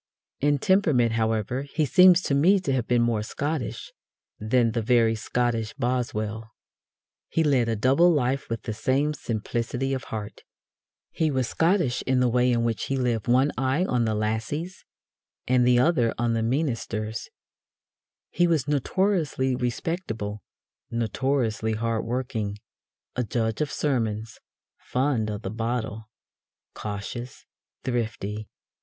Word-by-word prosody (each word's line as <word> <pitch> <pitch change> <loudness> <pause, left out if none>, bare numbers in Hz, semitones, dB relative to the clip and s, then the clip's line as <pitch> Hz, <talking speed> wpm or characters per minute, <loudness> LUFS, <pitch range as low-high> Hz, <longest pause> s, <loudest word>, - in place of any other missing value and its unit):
In 145 +1 +2
temperament, 145 - +3
however, 110 +2 0
he 145 +2 -1
seems 180 +3 +6
to - - 0
me 175 +8 +5
to 140 -7 -1
have 125 -3 -1
been 120 -1 +3
more 115 -2 +1
Scottish 145 +4 -4 0.5
than 115 +2 +2
the 115 0 -1
very 115 0 +3
Scottish 115 0 -1
Boswell. 115 -4 -2 0.8
He 165 - +1
led 130 -6 +2
a 115 - +1
double 135 +11 +4
life 135 -3 0
with 115 -1 -3
the 110 - -3
same 135 +7 +1
simplicity 120 +2 -2
of 130 - -3
heart. 105 -1 -6 0.7
He 160 -1 0
was 130 -4 0
Scottish 165 -6 +1
in 130 -1 +3
the 125 - +3
way 125 +1 +3
in 120 -1 +1
which 115 -2 -1
he 135 - -1
lived 120 -4 -1
with 120 - +4
one 135 +3 +3
eye 135 +7 +1
on 125 -8 +1
the 110 -1 0
"lassies" 110 - -3 0.6
and 125 -1 +3
the 125 -1 +5
other 125 -4 +3
on 120 0 +1
"the 115 - 0
meenister." 115 -4 -1 1.2
He 175 +2 +3
was 155 -5 +1
notoriously 150 -3 +1
respectable, 120 - -3 0.5
notoriously 115 -1 0
hard 115 0 -1
working, 115 -4 -3 0.6
a 125 - 0
judge 110 0 -1
of 150 - -1
sermons, 110 -6 -1 0.4
fond 125 -4 0
of 105 0 -5
the 95 - -3
bottle, 110 -1 -3 0.6
cautious, 110 +4 -6 0.4
thrifty. 110 -4 -3
120 Hz, 140 wpm, -26 LUFS, 110-140 Hz, 1.2 s, seems